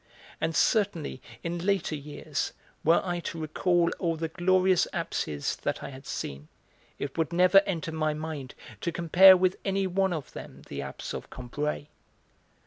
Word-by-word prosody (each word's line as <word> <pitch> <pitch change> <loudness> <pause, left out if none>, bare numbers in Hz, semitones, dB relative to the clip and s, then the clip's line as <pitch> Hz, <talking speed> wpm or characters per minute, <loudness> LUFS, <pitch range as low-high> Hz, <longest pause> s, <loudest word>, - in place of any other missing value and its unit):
And 160 0 0
certainly 190 - +1 0.2
in 170 0 -3
later 195 -4 +1
years, 145 0 -4 0.3
were 165 +2 +4
I 175 -1 -1
to 170 -1 -5
recall 170 +2 +1
all 165 -3 0
the 160 0 -3
glorious 185 +1 +3
apses 75 -2 -2
that - - -3
I - - -5
had 135 +1 -11
seen, 70 +2 -5 0.5
it - - -5
would 160 0 +1
never 180 +3 +6
enter 170 -3 -2
my 155 -1 0
mind 155 -4 -6 0.2
to 170 - -2
compare 175 +3 +7
with 185 0 +2
any 195 0 0
one 190 +1 +1
of 155 -5 -4
them - - -10
the 70 0 -4
apse 70 -1 -6
of - - -6
Combray. 145 +4 -4
165 Hz, 160 wpm, -28 LUFS, 150-185 Hz, 0.5 s, compare